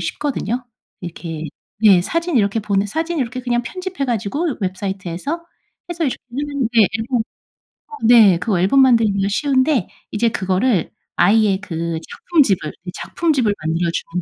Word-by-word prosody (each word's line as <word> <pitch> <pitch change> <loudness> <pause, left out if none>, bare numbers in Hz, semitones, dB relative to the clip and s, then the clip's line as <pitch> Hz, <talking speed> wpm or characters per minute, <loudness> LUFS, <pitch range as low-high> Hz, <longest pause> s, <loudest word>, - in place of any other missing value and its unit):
쉽거든요. 255 -4 -3 0.4
이렇게 165 -2 -6 0.4
예. 200 -5 +7
사진 335 - -1
이렇게 205 0 +2
보내 200 -1 0
사진 325 - -2
이렇게 255 0 -2
그냥 245 -1 0
편집해 370 +2 -4
가지고 255 - -2
웹사이트에서 190 - -4 0.5
해서 340 -1 -2
요즘엔 280 +2 -4
인제 230 -3 +3
앨범 240 +2 -1 0.7
어 450 - -16
네. 220 -7 +7
그거 185 0 0
앨범 200 +10 +4
만들기가 220 -6 +3
쉬운데 270 - +1 0.2
이제 230 +2 +1
그거를 190 0 0 0.3
아이의 205 -1 +3
그 170 -3 -3
작품집을, 235 - +1
이 180 - -5
작품집을 275 -11 0
만들어 165 +2 0
주는 175 +1 -3
225 Hz, 335 characters per minute, -19 LUFS, 190-275 Hz, 0.7 s, 예